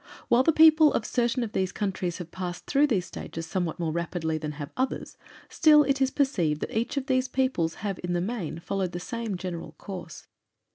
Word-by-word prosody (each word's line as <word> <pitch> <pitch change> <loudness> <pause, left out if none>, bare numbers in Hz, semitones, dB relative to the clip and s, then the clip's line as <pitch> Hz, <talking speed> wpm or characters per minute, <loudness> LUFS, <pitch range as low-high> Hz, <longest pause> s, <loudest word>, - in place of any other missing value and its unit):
While 240 - +5
the 295 - +4
peoples 315 -1 +6
of 215 - 0
certain 240 0 0
of 220 - -4
these 190 -3 0
countries 190 -4 -2
have 175 -2 -8
passed 180 -1 -5
through 290 +1 +3
these 195 -9 0
stages 165 -2 -7
somewhat 175 -1 -2
more 165 -2 -1
rapidly 165 -1 -2
than 150 -1 -4
have 145 +1 -7
others, 260 +1 -2 0.3
still 300 -2 +6
it 275 -1 0
is 265 - +4
perceived 180 - 0
that - - -4
each 230 +5 -1
of 270 - -1
these 260 -2 +1
peoples 255 -12 0
have 195 -2 -2
in 175 0 -1
the 175 - +1
main 185 -4 -3
followed 180 +1 -3
the 175 - -3
same 225 +1 -4
general 175 -2 -6
course. 180 -4 -9
190 Hz, 205 wpm, -27 LUFS, 175-260 Hz, 0.3 s, peoples